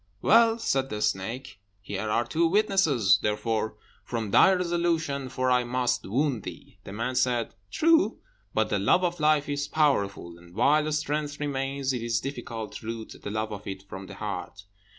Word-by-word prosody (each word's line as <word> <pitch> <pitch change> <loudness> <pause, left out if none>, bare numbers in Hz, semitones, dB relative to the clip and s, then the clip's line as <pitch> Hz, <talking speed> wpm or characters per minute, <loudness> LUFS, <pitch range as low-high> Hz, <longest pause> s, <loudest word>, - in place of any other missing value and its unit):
"Well," 230 -1 +5
said 135 - 0
the 105 - -4
snake, 105 +3 -2 0.2
"here 100 +1 -4
are 115 +3 +1
two 165 +1 +1
witnesses; 185 - +3
therefore, 110 +1 -1 0.3
form 115 -4 -4
thy 190 - +7
resolution, 170 -6 0
for 130 +1 0
I 125 0 +4
must 125 -2 -1
wound 130 +2 0
thee." - - -10
The - - -8
man 115 +5 -2
said, 125 -2 +1 0.2
"True; 330 - +3 0.3
but - - +1
the - - +1
love 185 - +3
of 175 -1 -1
life 150 -1 +3
is 145 0 -2
powerful, 100 - 0
and 85 +1 -17
while 155 +5 +3
strength 150 0 -2
remains, 135 -2 -2
it 125 - -3
is 115 0 0
difficult 120 -4 -6
to 110 - -11
root 115 -1 -6
the - - -5
love 110 +1 -2
of 100 0 -8
it 95 -1 -6
from 95 0 -8
the - - -9
heart. 100 -1 -6
125 Hz, 175 wpm, -27 LUFS, 110-150 Hz, 0.3 s, thy